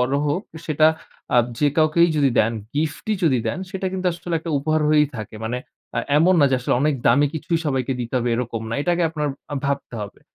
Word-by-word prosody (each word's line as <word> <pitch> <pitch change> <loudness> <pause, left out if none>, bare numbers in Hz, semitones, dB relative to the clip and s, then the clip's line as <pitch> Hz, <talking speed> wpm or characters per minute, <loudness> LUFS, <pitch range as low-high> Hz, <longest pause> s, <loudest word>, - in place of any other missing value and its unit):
বড় 125 +2 +1
হোক 150 +6 0 0.2
সেটা 155 0 +4 0.5
আব 120 - +5
যে 145 - +3
কাউকেই 160 +2 +4
যদি 140 -2 +3
দেন, 110 +2 +3 0.2
গিফটই 160 +8 -1
যদি 130 -6 +3
দেন - - -2
সেটা 190 0 -3
কিন্তু 185 -1 -2
আসলে 170 0 -5
একটা 165 +1 -6
উপহার 155 +2 0
হয়েই 150 -1 +5
থাকে। 110 0 -7
মানে 125 +3 -2 0.4
এ্যা - - 0 0.2
এমন 180 +4 +5
না 145 - +6
যে - - +3
আসলে - - 0
অনেক 150 +1 +2
দামি 140 +5 +5
কিছুই 165 +2 -1
সবাইকে 135 -2 0
দিতে 120 +1 -5
হবে 120 - -1
এরকম 115 -2 -3
না। - - -1
এটাকে 175 +1 +1
আপনার 150 -2 -2 0.2
অ্যা 145 - -4
ভাবতে 140 -3 -2
হবে। 100 - -9
150 Hz, 215 wpm, -22 LUFS, 125-165 Hz, 0.5 s, না